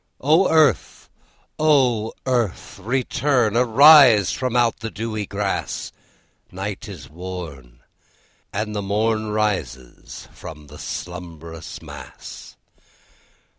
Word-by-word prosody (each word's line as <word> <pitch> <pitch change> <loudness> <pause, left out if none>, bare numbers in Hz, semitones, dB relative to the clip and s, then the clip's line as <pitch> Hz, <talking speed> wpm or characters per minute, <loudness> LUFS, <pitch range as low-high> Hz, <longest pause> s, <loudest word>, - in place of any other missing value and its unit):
'O 160 +7 +3
Earth, 155 -6 +2 0.5
O 130 -8 +2
Earth, 120 -8 -2
return! 125 0 0
Arise 125 - +7
from 125 -2 -3
out 120 -2 +2
the 115 - -5
dewy 110 -2 -4
grass! 100 -1 -3 0.6
Night 100 +3 -6
is 80 -9 -10
worn, 75 -8 -9 0.7
And 105 +1 -3
the 105 - -2
morn 110 +2 0
Rises 105 - -4
from 75 -1 -11
the 75 +1 -13
slumbrous 85 -2 -8
mass. - - -11
105 Hz, 95 wpm, -21 LUFS, 90-125 Hz, 0.7 s, Arise